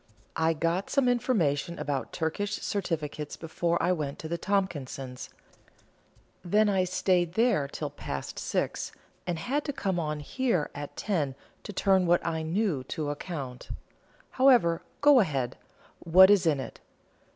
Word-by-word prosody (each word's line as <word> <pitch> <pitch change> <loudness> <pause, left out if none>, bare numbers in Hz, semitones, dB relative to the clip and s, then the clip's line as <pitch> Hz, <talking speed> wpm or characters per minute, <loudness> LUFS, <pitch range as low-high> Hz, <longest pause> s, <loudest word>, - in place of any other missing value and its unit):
I 160 0 +2
got 170 +4 -1
some 275 -3 +2
information 180 - +1
about 140 -2 -3
Turkish 200 +6 -2
certificates 155 -6 -3
before 170 +1 -1
I 180 - +3
went 150 -5 -2
to 160 - -7
the 170 - -2
Tompkinses; 140 -10 -2 1.1
then 210 +4 +3
I 190 -2 +2
stayed 180 -2 +1
there 220 - +2
till 145 0 -5
past 70 - -6
six, - - -2 0.4
and 175 -2 -1
had 275 - -1
to - - -1
come 190 -9 -2
on 150 -2 -2
here 205 - -1
at 145 0 -7
ten 155 -10 -1 0.3
to - - -7
turn 190 -2 +2
what 175 0 +3
I 160 -1 -1
knew 165 -3 0
to 145 +2 -3
account. 140 -5 -6 0.6
However, 240 -11 +4 0.2
go 290 -2 +7
ahead; 135 - 0 0.4
what 185 +3 +7
is 190 -4 +4
it 150 -3 +3
in? 130 - -5
170 Hz, 145 wpm, -28 LUFS, 150-200 Hz, 1.1 s, go